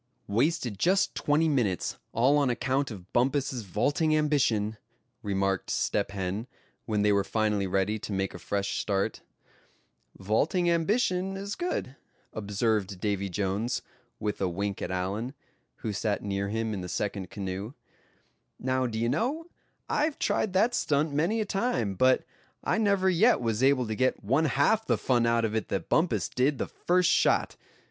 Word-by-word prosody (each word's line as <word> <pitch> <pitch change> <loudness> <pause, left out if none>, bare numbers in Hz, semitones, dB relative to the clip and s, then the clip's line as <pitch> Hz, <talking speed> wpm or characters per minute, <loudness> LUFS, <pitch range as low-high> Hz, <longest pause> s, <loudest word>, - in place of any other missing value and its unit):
"Wasted 120 - 0
just 190 +3 +2
twenty 150 +2 +2
minutes, 120 - 0
all 135 +6 +3
on 140 -3 +2
account 130 +3 0
of 95 -5 -10
Bumpus's 130 0 +1
vaulting 145 - +1
ambition," 120 -8 +1 0.4
remarked 95 -1 -1
Step 100 - 0
Hen, 100 +3 -3 0.4
when 105 -2 0
they 105 - +4
were 100 0 +3
finally 105 -1 0
ready 95 +3 0
to 105 - -7
make 95 -1 -1
a 90 - -8
fresh 100 +3 -2
start. 100 -2 -1 1.0
"Vaulting 130 - +1
ambition 185 +1 +1
is 200 +1 -4
good," 345 - -3 0.4
observed 105 -2 -1
Davy 100 -1 -1
Jones, 100 +6 -1 0.4
with 105 -1 -3
a 95 - +1
wink 100 +3 -3
at - - -3
Allan, 100 +8 -3 0.5
who 110 - -1
sat 100 +1 -1
near 100 0 -2
him 110 +1 -1
in 95 - -4
the 90 - -6
second 95 0 -3
canoe. 100 +3 -5 0.8
"Now, 130 0 0
d'ye 115 0 -1
know, 270 - -1 0.4
I've 300 0 0
tried 200 - 0
that 215 +6 +3
stunt 150 -4 +1
many 175 +10 +1
a - - -1
time, 195 - 0
but 130 +7 +3 0.4
I - - +1
never 200 -3 +2
yet 190 +7 +4
was 115 -1 -1
able 135 -1 +4
to 110 - -3
get 130 +4 0
one 135 +10 +2
half 150 +10 +2
the - - +1
fun 120 -2 +2
out 115 -1 +2
of 110 0 -2
it 110 - -1
that - - -3
Bumpus - - +2
did 135 +3 +1
the - - -1
first 180 -1 +2
shot. - - +2
115 Hz, 160 wpm, -28 LUFS, 100-150 Hz, 1.0 s, they